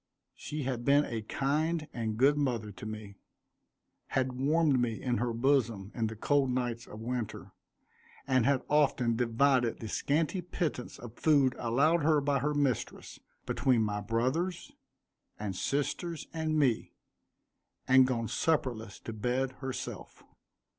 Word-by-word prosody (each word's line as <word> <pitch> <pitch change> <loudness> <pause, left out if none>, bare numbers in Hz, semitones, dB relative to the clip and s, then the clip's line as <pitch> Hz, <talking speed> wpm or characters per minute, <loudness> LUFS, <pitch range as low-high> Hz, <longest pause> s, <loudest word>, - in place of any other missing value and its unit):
She 150 -1 -5
had 125 -2 -2
been 140 +3 +4
a 115 -2 -4
kind 150 +7 -1
and 110 -2 -3
good 140 +4 +5
mother 120 -7 -1
to 100 +2 -9
me; 105 -2 -8 0.9
had 130 -1 0
warmed 145 +1 +2
me 115 -3 -1
in 125 -2 -1
her 120 0 0
bosom 115 -5 +1
in 115 -2 -1
the 110 - -6
cold 140 +4 +2
nights 120 -2 -2
of 105 - -9
winter; 120 -2 -4 0.7
and 130 -2 +3
had 135 +1 +2
often 135 -5 +2
divided 120 +1 +2
the 110 - -6
scanty 155 - 0
pittance 160 -7 -3
of 120 -1 -11
food 140 -5 +4
allowed 140 +8 +2
her 155 0 +4
by 140 -1 +1
her 150 +2 -1
mistress, 140 -5 -2 0.3
between 125 -5 +2
my 105 -1 -2
brothers, 130 - -1 0.7
and 100 -3 -4
sisters, 145 - -2
and 160 -1 -1
me, 130 -7 +1 0.9
and 130 0 +6
gone 115 -3 -1
supperless 120 -10 -1
to 115 - -6
bed 125 +4 -1
herself. 130 -1 -6
130 Hz, 140 wpm, -31 LUFS, 115-145 Hz, 0.9 s, and